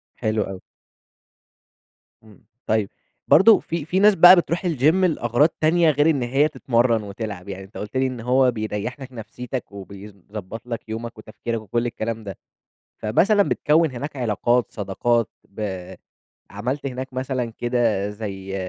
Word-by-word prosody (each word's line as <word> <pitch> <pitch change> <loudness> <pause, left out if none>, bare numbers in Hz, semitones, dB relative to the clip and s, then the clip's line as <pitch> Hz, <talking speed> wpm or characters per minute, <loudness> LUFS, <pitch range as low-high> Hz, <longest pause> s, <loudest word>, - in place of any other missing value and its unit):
حلو 110 -1 0
أوي. 95 -1 -8 1.6
إمم، 110 0 -19 0.2
طيب 110 -2 +1 0.4
برضه 210 +7 +7
في 165 -3 -4
في 180 +4 0
ناس 205 0 +6
بقى 180 +2 +9
بتروح 175 0 0
الgym 155 -8 -2
لأغراض 150 -6 +2
تانية 165 +1 +4
غير 150 +2 +3
إن 140 -5 +1
هي 135 +5 +2
تتمرن 120 -5 +1
وتلعب، 100 -2 -7
يعني 95 0 -6
أنت 95 - -12
قُلت 105 +5 -5
لي 130 - +2
إن 130 -2 -6
هو 125 +2 +3
بيريّح 110 +2 -4
لك 130 -1 -9
نفسيتك، 125 +1 -7
وبيضبط 100 +2 -10
لك 115 -2 -6
يومك 115 +1 -6
وتفكيرك 110 +1 -5
وكل 120 +3 -2
الكلام 115 -1 -4
ده، 100 -3 -7 0.6
فمثلًا 200 - +3
بتكوّن 160 -3 +2
هناك 140 +4 -6
علاقات، 120 0 +1
صداقات 110 +2 0 0.2
ب 95 -3 -6 0.6
عملت 125 +8 -3
هناك 130 0 -5
مثلًا 130 -2 -2
كده 115 -5 0
زي 100 -2 -6
120 Hz, 145 wpm, -22 LUFS, 105-135 Hz, 1.6 s, بقى